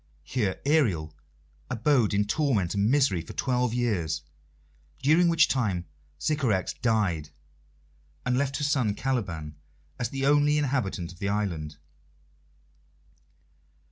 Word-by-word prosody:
Here 105 -7 -1
Ariel 105 - +2 0.6
abode 125 -2 +2
in 105 +1 +2
torment 110 - +1
and 100 +1 +1
misery 130 - +3
for 80 - -10
twelve 125 -2 0
years, 90 -11 -1 0.8
during 160 +5 +5
which 165 -1 +5
time 100 -10 0 0.3
Sycorax 125 - 0
died, 100 -10 0 1.0
and 125 - +1
left 135 0 0
her 150 - -3
son 130 -8 +1
Caliban 85 - -3 0.4
as 120 - -1
the 135 +1 -2
only 145 +1 +4
inhabitant 125 - -1
of 85 - -15
the 100 - -1
island. 85 -8 -2
115 Hz, 115 wpm, -27 LUFS, 95-140 Hz, 1.0 s, during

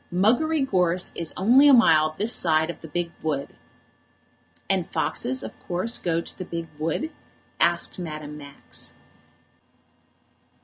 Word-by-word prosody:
Muggery 250 - +2
Gorse 180 -4 +1
is 165 -2 -4
only 245 +9 +6
a 285 - +8
mile 155 -9 +4
this 220 +4 +2
side 160 -1 +1
of - - -15
the 160 - -9
big 170 +2 -3
wood." 145 -3 -2 1.1
"And - - +1
foxes 130 0 -2
of 110 - -6 0.2
course 185 +7 -1
go 165 -1 0
to - - -10
the - - -3
big 170 -2 -6
wood?" 165 - -2 0.5
asked 170 +2 +2
Madame 155 -3 -6
Max. 140 -2 -5
170 Hz, 135 wpm, -25 LUFS, 155-200 Hz, 1.1 s, a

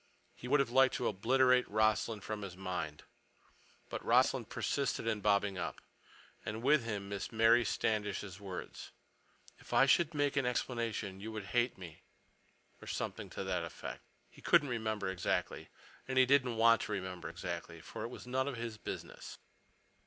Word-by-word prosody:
He 125 - -9
would 145 +3 +4
have 135 -4 +1
liked 130 +1 +5
to 125 - -1
obliterate 125 +5 +3
Rossland 110 0 +1
from 110 -1 -4
his 95 -3 -7
mind. 90 -5 -4 0.8
But - - -5
Rossland - - +3
persisted 140 -4 -1
in 110 -2 0
bobbing 100 -2 +2
up, 85 -5 -4 0.6
and 110 +2 -5
with 140 -2 +4
him 100 -3 -4 0.2
Mary 115 +2 +5
Standish's 105 -3 -1
words, 95 -3 -7 0.7
"If - - -11
I 135 - +6
should 155 +4 +3
make 145 0 +1
an 135 -3 +2
explanation, 115 -6 -2
you 110 +3 -6
would 110 -2 -5
hate 120 0 +2
me," 85 -4 -10 0.8
or - - -11
something - - -4
to - - -5
that - - -1
effect. - - -7 0.3
He - - -16
couldn't 150 -5 +4
remember 110 -4 -2
exactly. 95 -2 -2 0.4
And 130 -1 -2
he 130 - +7
didn't 130 -3 +3
want 115 0 +6
to 105 - -3
remember 95 -3 -4
exactly, 85 0 -6
for - - -8
it - - -2
was 125 - -9
none 130 +2 0
of 140 - -3
his 115 -2 -5
business. - - -7
110 Hz, 165 wpm, -34 LUFS, 100-125 Hz, 0.8 s, he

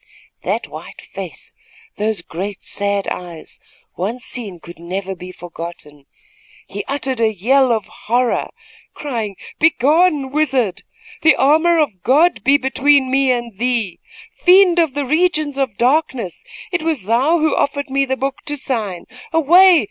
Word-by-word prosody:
That - - -2
white - - -10
face, - - -9 0.4
those 210 -4 -1
great, 190 +5 -6
sad 200 -1 -2
eyes 175 -3 -7 0.4
once 225 +7 -3
seen 205 -8 -6
could 170 0 -13
never 190 +3 -4
be 180 0 -9
forgotten. 165 -5 -9 0.6
He - - -6
uttered 265 -3 -2
a 220 -1 +3
yell 250 +6 +2
of 220 -3 0
horror, 245 +2 -1 0.5
crying: 230 -8 -4 0.2
"Begone, 305 -1 +3
wizard! 270 -10 0 0.4
The 315 - +5
armor 320 +5 +3
of 255 - 0
God 300 - +3
be 275 +3 +5
between 270 0 +2
me 270 0 +2
and 235 -4 -3
thee! 235 -7 -1 0.3
Fiend 360 -1 +5
of 320 -5 +1
the 290 -1 -1
regions 310 -1 +1
of 255 -7 -1
darkness, 255 - 0 0.3
it 360 -2 -1
was 315 - -1
thou 250 - +2
who 315 -2 +1
offered 285 0 -1
me 275 +1 +2
the 265 -1 -2
book 270 +1 -2
to 295 0 -2
sign. 215 -10 -3 0.3
Away! 340 +3 +6
260 Hz, 145 wpm, -18 LUFS, 205-295 Hz, 0.6 s, Away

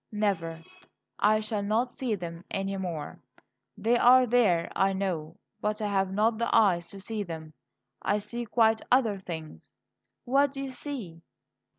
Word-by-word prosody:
"Never. 170 -6 -1 0.6
I 215 +1 +4
shall 215 -1 -2
not 215 +5 +1
see 245 -2 -2
them 170 -2 -7
any 195 0 -2
more. 175 -6 -5 0.6
They 230 +3 +2
are 255 +1 +7
there, 220 -9 +3
I 195 0 +3
know; 180 -4 -3 0.2
but 210 +1 -1
I 210 -1 -1
have 195 -1 +1
not 220 +3 +1
the 235 - 0
eyes 175 -6 +3
to 195 - -10
see 215 +2 -4
them. 160 -4 -7 0.5
I 205 - +1
see 235 +3 -5
quite 220 0 +3
other 230 -6 +3
things." 160 - -8 0.5
"What 275 +2 +3
do 275 -1 -4
you 270 - -5
see?" 235 - -7
205 Hz, 160 wpm, -28 LUFS, 175-230 Hz, 0.6 s, are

